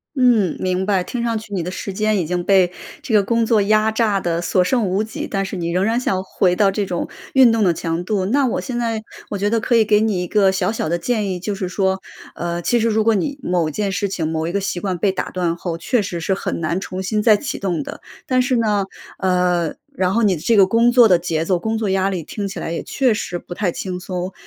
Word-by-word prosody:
嗯， 240 - +3
明 185 0 -1
白。 195 -2 +2
听 240 -1 -3
上 230 -1 0
去 215 -1 -11
你 185 -4 -1
的 180 - -4
时 195 +1 -5
间 215 +1 +1
已 175 - -1
经 175 +2 -2
被 190 -2 +4 0.3
这 235 - -4
个 210 -2 +5
工 230 +3 +1
作 220 -2 +3
压 215 +2 +3
榨 215 -3 +1
得 170 -2 -1
所 180 +1 +2
剩 225 +5 +1
无 190 +2 0
几， 220 0 -5
但 195 -1 -2
是 195 - -5
你 170 -1 -2
仍 180 +3 +1
然 225 +2 +1
想 190 -6 0
回 185 -1 +1
到 200 +2 +3
这 200 +1 -1
种 180 -2 -3 0.3
运 260 -3 +7
动 225 -1 +2
的 180 -3 +3
强 165 +1 -3
度， 190 0 -1
那 270 +8 +2
我 245 - 0
现 250 -3 -4
在 230 -2 -1 0.3
我 205 - -3
觉 205 +2 0
得 230 0 +1
可 245 - -1
以 220 - +4
给 210 0 +3
你 210 -5 +1
一 180 - -3
个 195 0 +3
小 190 -1 0
小 215 -7 -2
的 170 - +1
建 210 +3 -1
议。 180 - -3
就 200 +3 -3
是 185 -2 -3
说， 190 0 0 0.3
呃， 175 0 -3
其 240 - +1
实 230 0 +2
如 220 0 +1
果 225 - +4
你 280 +8 -2
某 175 -3 0
件 205 +5 -2
事 200 +1 -1
情、 170 -4 -2
某 160 0 -2
一 - - -2
个 200 - 0
习 190 -2 -3
惯 190 -3 -2
被 190 +2 +1
打 - - -3
断 175 -2 -1
后， 170 -1 -4
确 240 +7 0
实 185 -4 -4
是 170 +4 0
很 190 - -3
难 165 +1 -1
重 185 -1 -5
新 210 +3 -1
再 215 -2 +6
启 280 - -4
动 185 -4 -2
的。 285 - -8 0.2
但 255 -3 +2
是 250 0 +1
呢 210 -3 +1 0.3
呃， 180 -3 +1 0.2
然 185 -4 +1
后 230 +2 +2
你 200 -3 +3
的 155 - -8
这 230 +5 +2
个 195 -2 +7
工 230 +4 +3
作 240 -2 +7
的 180 -4 +5
节 165 -2 -2
奏、 185 0 +2
工 220 +5 -2
作 220 -2 -1
压 190 0 +1
力 185 -3 -3
听 200 +6 -5
起 - - -6
来 165 - -4
也 - - -3
确 255 -4 +1
实 175 -4 -4
不 175 - -9
太 185 -1 -1
轻 185 +1 -4
松。 180 0 -5
195 Hz, 290 characters per minute, -20 LUFS, 180-220 Hz, 0.3 s, 运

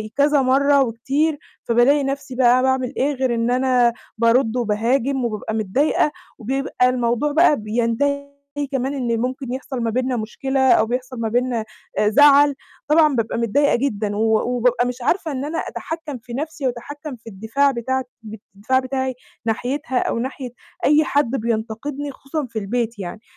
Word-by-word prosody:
كذا 285 0 +3
مرّه 275 +2 +4
وكتير، 275 +6 -1 0.2
فبالاقي 250 +5 +3
نَفْسي 270 -1 -4
بقى 250 0 +4
باعمل 260 0 0
إيه 285 +2 +1
غير 260 -2 0
إن 230 +1 0
أنا 250 -2 +3 0.2
بارُدّ 230 +1 +3
وباهاجم، 245 +4 0
وبابقى 220 -1 -3
متضايقة، 240 +8 +1 0.3
وبيبقى 255 +1 0
الموضوع 245 +3 0
بقى 315 0 +5
بينتهي 240 +6 -1 0.4
كمان 270 +1 -1
إن 240 -4 -1
ممكن 255 0 -3
يحصل 265 -1 -5
ما 230 - 0
بيننا 250 +1 -1
مشكلة، 265 +4 0
أو 220 - +5
بيحصل 250 +1 -4
ما 225 -1 -1
بيننا 240 -1 0 0.3
آآ، 210 - +3
زَعَل. 285 +3 +6 0.3
طبعًا 305 -2 +4
بابقى 230 0 -1
متضايقة 265 +6 +2
جدًا، 215 -5 -1
و 215 - 0 0.3
وبابقى 245 0 +2
مش 250 0 -5
عارفة 325 +4 0
إن 270 +1 -3
أنا 325 +2 -3
أتحكّم 320 -5 -5
في 235 +1 -11
نفسي، 295 0 -3
وأتحكّم 285 +4 -6
في 225 0 -13
الدفاع 225 +8 +1
بتاعت 260 +1 -2 0.2
ب 215 0 -8 0.2
الدفاع 260 +6 +1
بتاعي 260 -1 -2 0.3
ناحيتها، 255 +5 -2
أو - - -1
ناحية 255 +1 -4 0.4
أي 300 +2 +5
حد 285 -5 +1
بينتقدني 235 +4 -3
خصوصًا 275 +2 -5
في 225 -2 -4
البيت 230 +1 -2
يعني، 190 +4 -6
255 Hz, 160 wpm, -21 LUFS, 230-280 Hz, 0.4 s, زَعَل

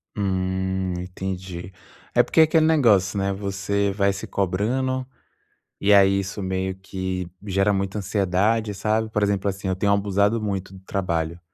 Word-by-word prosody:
Hum, 95 -1 -1
entendi. 90 0 -6 0.4
É - - +6
porque - - +3
aquele 160 0 +4
negócio, 110 - +3
né, 100 0 0
você 100 +1 -1
vai 100 0 +2
se 100 - -6
cobrando, 125 +8 -1 0.8
e 105 - +3
aí 100 0 +5
isso 100 +1 -5
meio 95 0 -2
que 95 -2 -4 0.2
gera 95 +1 +2
muita 100 +1 -2
ansiedade, 100 +2 +1
sabe. 110 +2 0
Por 105 -1 -1
exemplo, 100 -1 +1
assim, 95 0 -3
eu 95 - 0
tenho 100 +2 +2
abusado 100 +2 +2
muito 100 -3 -3
do 95 - -12
trabalho. 85 -3 -2
100 Hz, 150 wpm, -23 LUFS, 95-105 Hz, 0.8 s, É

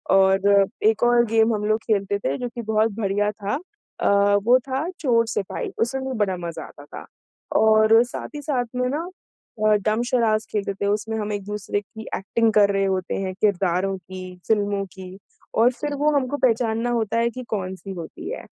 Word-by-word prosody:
और 195 +1 +5 0.2
एक 220 +1 +3
और 240 0 +4
गेम 225 0 +3
हम 210 0 -3
लोग 215 +1 +2
खेलते 200 -2 +1
थे 135 -6 -2
जो 245 - -4
कि 235 - -4
बहुत 220 0 +1
बढ़िया 205 0 +1
था, 205 +2 -3 0.4
अ, 200 0 +3
वो 245 +4 +5
था 270 +5 -2
चोर-सिपाही 230 - 0
उसमे 240 +4 0
भी 260 - -3
बड़ा 190 -3 +1
मज़ा 170 -2 -6
आता 145 - -14
था। - - -10 0.5
और, 220 +1 +5
साथ 245 - -6
ही 295 - -5
साथ 270 -4 -1
में 250 0 0
ना 320 +6 -3 0.6
अ, 215 - +5
डम्ब 215 +3 0
शराड्स 220 -3 +2
खेलते 200 -2 -1
थे 195 - -4
उसमें 215 +2 -1
हम 210 -1 -3
एक-दूसरे 205 0 -3
की 220 +2 -11
एक्टिंग 225 +3 +1
कर 205 -1 +5
रहे 195 0 +1
होते 190 -1 -1
हैं 190 -1 -3
किरदारों 195 -2 +1
की, 185 0 -9
फिल्मों 205 -2 +1
की 185 0 -10 0.4
और 240 +2 +5
फिर 290 +4 -4
वो 295 +2 +2
हमको 280 0 0
पहचानना 230 -2 +1
होता 230 -2 0
है 235 0 +2
कि 255 +2 -7
कौन-सी 190 -1 -4
होती 170 -3 -8
है। - - -6
215 Hz, 185 wpm, -23 LUFS, 195-235 Hz, 0.6 s, और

